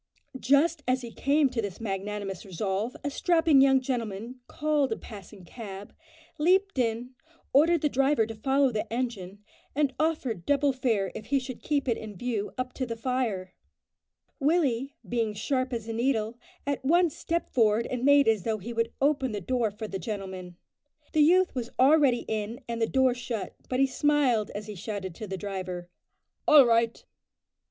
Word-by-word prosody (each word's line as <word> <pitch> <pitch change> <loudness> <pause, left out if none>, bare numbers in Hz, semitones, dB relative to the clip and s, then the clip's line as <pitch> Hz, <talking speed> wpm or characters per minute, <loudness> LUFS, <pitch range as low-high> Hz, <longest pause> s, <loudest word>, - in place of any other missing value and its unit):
Just 290 +6 +3
as 255 0 +1
he 235 - -7
came 285 +4 +2
to 240 -3 -1
this 200 -4 -5
magnanimous 200 -2 -4
resolve, 195 +5 -3
a 285 - -2
strapping 325 -3 +4
young 270 -1 +5
gentleman 240 -2 -4
called 295 -4 0
a 225 - -1
passing 200 -2 -11
cab, 200 -1 -9 0.5
leaped 375 +1 +2
in, 235 +1 -1 0.4
ordered 320 +4 +5
the 300 - +3
driver 270 -3 +2
to 225 - -6
follow 270 +4 +2
the 215 0 -3
engine, 210 -5 -4 0.3
and 285 -2 +1
offered 290 - -1
double 285 -1 +3
fare 225 -8 0
if 215 - -8
he 280 - +2
should 255 -2 -5
keep 285 -3 -1
it 235 - +1
in 215 -2 -8
view 215 0 -3
up 255 0 -3
to 255 - -3
the 230 - -4
fire. 225 -6 -2 0.9
Willie, 275 -4 +1
being 230 -3 -1
sharp 255 +4 -1
as 230 -2 -4
a 225 - -3
needle, 230 -2 0 0.3
at 280 -1 -2
once 335 +3 +3
stepped 340 +1 -2
forward 225 -1 +3
and 250 -1 -4
made 285 -1 +5
as 220 -3 +3
though 220 +4 -1
he 220 +4 -7
would 230 0 0
open 275 -4 +2
the 205 - -2
door 235 +3 0
for 215 +2 -7
the 195 -2 -5
gentleman. 185 -2 -6 0.6
The 310 - +4
youth 365 +5 +4
was 245 -2 -4
already 270 -2 +4
in 220 +2 -3
and 230 -1 -3
the 225 - +3
door 260 0 +3
shut, 240 -3 -5 0.2
but 255 - 0
he 270 - +6
smiled 270 -5 +2
as 205 +1 -5
he 210 - -7
shouted 195 -1 -5
to 215 +5 -8
the 190 0 -4
driver, 185 -2 -5 0.6
"All 295 -3 +8
right!" 230 0 +1
240 Hz, 180 wpm, -28 LUFS, 210-275 Hz, 0.9 s, All